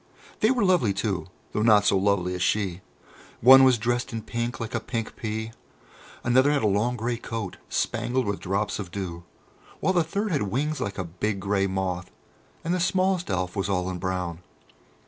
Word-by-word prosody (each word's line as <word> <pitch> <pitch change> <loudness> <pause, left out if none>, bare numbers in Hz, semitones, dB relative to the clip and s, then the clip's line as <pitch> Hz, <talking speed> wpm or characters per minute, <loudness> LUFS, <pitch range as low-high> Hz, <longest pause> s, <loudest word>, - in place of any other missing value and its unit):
They 215 - +4
were 245 -5 +2
lovely 175 - +3
too, 95 -3 -2 0.2
though 105 - -1
not 105 -2 +5
so - - +4
lovely 95 -2 +1
as 90 - -4
she. 95 -1 0 0.6
One 130 +3 +9
was 130 -2 +6
dressed 120 +3 -1
in 115 -1 -4
pink, 120 +1 -3
like 115 -2 -5
a 115 - 0
pink 115 0 -4
pea; 110 0 -4 0.7
another 130 +4 +4
had 145 -4 +1
a - - +4
long 105 +5 +1
grey 120 +1 -1
coat, 115 -5 -5
spangled 125 0 0
with 100 -1 -2
drops 100 +3 -1
of 95 -4 -5
dew, 85 -2 -5 0.5
while 190 - +1
the 175 -2 +3
third 200 +6 -2
had 145 - +1
wings 140 +10 -1
like 100 -1 -3
a 95 - -1
big 95 +4 -3
grey 100 0 +1
moth, 95 -1 -2 0.5
and 170 - 0
the 180 - 0
smallest 185 0 +1
Elf 90 -1 -1
was 95 0 -1
all 90 -1 0
in 90 - -5
brown. 90 -2 -3
105 Hz, 190 wpm, -26 LUFS, 95-125 Hz, 0.7 s, One